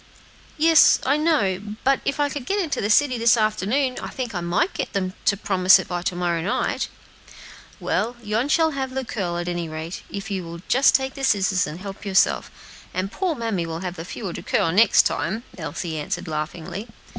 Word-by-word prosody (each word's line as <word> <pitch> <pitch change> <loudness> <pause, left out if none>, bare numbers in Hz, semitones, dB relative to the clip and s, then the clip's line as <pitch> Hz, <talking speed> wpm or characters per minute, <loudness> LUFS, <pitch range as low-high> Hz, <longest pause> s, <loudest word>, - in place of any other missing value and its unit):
"Yes, 320 0 +6
I 275 - +3
know; 210 - 0
but 270 0 +3
if 280 - -1
I 290 - +3
could 275 -3 -6
get 405 +1 0
into 330 -7 -1
the 205 - -1
city 255 +2 +3
this 230 +1 +5
afternoon, 220 +5 0
I - - -5
think 245 -4 -5
I 175 - -2
might 175 - 0
get - - -4
them 185 -2 -1
to 200 - +3
promise 190 -2 +5
it 190 - -5
by 175 -1 -3
to 180 - -2
morrow 175 -2 0
night." 185 - -1 0.9
"Well, 235 +3 -1
you 220 +6 -1
shall 320 +1 +3
have 265 -2 -4
the 265 -1 -2
curl, 180 -7 -3
at 175 0 -3
any 175 -2 -3
rate, 160 +3 -6
if 200 +1 -6
you 190 -2 -2
will 170 0 -8
just 265 +2 +4
take 265 0 +1
the 275 - -8
scissors 190 -6 +2
and 155 +3 -7
help 195 -1 -8
yourself, 195 -2 +2 0.5
and 185 +2 -2
poor 360 +4 -1
mammy 220 -9 -2
will 165 +1 -5
have 180 -1 -4
the 165 - -6
fewer 185 +1 -6
to - - -6
curl - - +1
the - - -1
next 215 +2 +6
time," 220 +4 -1
Elsie 160 -3 -4
answered, 180 +4 -4
laughingly. 165 +6 -5
200 Hz, 210 wpm, -23 LUFS, 175-260 Hz, 0.9 s, Yes